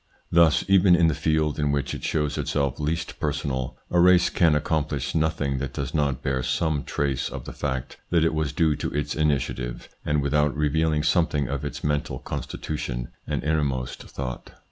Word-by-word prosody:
Thus, 85 -2 +5
even 95 -2 +6
in 85 -1 +4
the - - +1
field 75 -1 0
in 75 -1 +1
which 70 -1 -1
it - - -6
shows 75 -2 0
itself 70 -3 -1
least 80 +3 -2
personal, 70 -4 -2
a 90 - +3
race 90 0 +5
can 80 -4 +4
accomplish 75 -2 -1
nothing 75 -4 0
that 70 -1 -4
does 70 -3 -4
not 70 -4 0
bear 65 -1 0
some 75 +2 0
trace 70 -3 -1
of - - -7
the - - -7
fact 65 -3 -3
that 85 -2 +3
it 80 - +2
was 80 -3 0
due 75 0 +2
to - - -2
its 75 -1 -1
initiative, 70 -5 -1
and 75 -1 +1
without 75 0 +1
revealing 75 +1 +1
something 75 -3 +2
of 70 +1 -3
its 75 - -5
mental 75 0 -1
constitution - - -4 0.2
and - - -2
innermost 70 -5 -1
thought. 65 -2 -6
75 Hz, 180 wpm, -25 LUFS, 70-80 Hz, 0.2 s, even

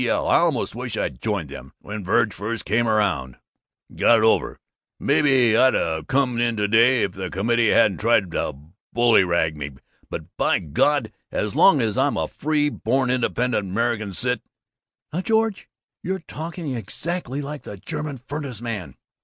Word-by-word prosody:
L. - - 0
I - - +5
almost - - +1
wish - - -5
I'd 60 - -3
joined - - -2
it - - -8 0.2
when 105 0 -7
Verg 110 +3 +2
first 110 +2 -4
came 115 +4 +1
around, 100 - 0 0.5
and - - -16
got 120 - +6
it 110 - +1
over. 110 - +3 0.5
And - - -10
maybe 130 -6 +4
I'd've 80 -11 +2
come 130 -2 +1
in 120 -1 +1
to 105 0 +1
day 115 +3 +4
if - - -1
the 95 -1 -5
committee 115 +4 +1
hadn't 95 - +3
tried 105 -5 +2
to 75 -3 -2 0.4
bullyrag 95 -9 +3
me, 70 -1 -6 0.4
but, - - -5
by - - +2
God, 110 - +1 0.2
as 105 -1 -2
long 155 -9 +6
as 110 +1 0
I'm 140 +2 +1
a - - -1
free 150 -1 0
born 130 -1 0
independent 125 -3 0
American 110 0 -1
cit 125 +4 -1 0.4
" - - -46
"Now, 175 - -1
George, 220 0 0 0.3
you're 190 -1 -3
talking 165 -2 -5
exactly 135 - -4
like 145 +1 -6
the 100 - -9
German 150 - -5
furnace 135 -2 -6
man." 115 -6 -5
120 Hz, 170 wpm, -23 LUFS, 105-135 Hz, 0.5 s, got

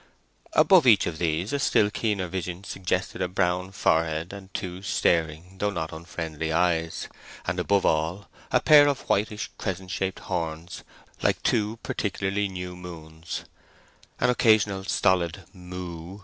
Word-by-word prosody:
Above - - +6
each - - +6
of 80 - -4
these 85 - -1
a 145 - +1
still 105 -6 +3
keener 105 -4 -1
vision 90 +1 -4
suggested 95 -1 -2
a 90 - +1
brown 90 0 0
forehead 80 -2 +1
and 100 -1 -10
two 90 0 -5
staring 85 -1 0
though 105 - +1
not 80 -6 -4
unfriendly 80 -1 -5
eyes, 80 -1 +1 0.4
and 85 +1 -1
above 100 +2 +2
all 80 +6 0 0.2
a - - +5
pair 145 -1 +7
of 140 -2 0
whitish 105 +1 0
crescent 95 -2 -4
shaped 95 -1 -2
horns 85 -1 -4 0.4
like - - +2
two 105 +1 +1
particularly 100 0 -1
new 90 -1 -6
moons, 80 -2 -8 0.7
an 125 - +3
occasional 105 -5 +3
stolid 95 -2 +1
"moo!" 90 0 -8
90 Hz, 140 wpm, -26 LUFS, 85-100 Hz, 0.7 s, pair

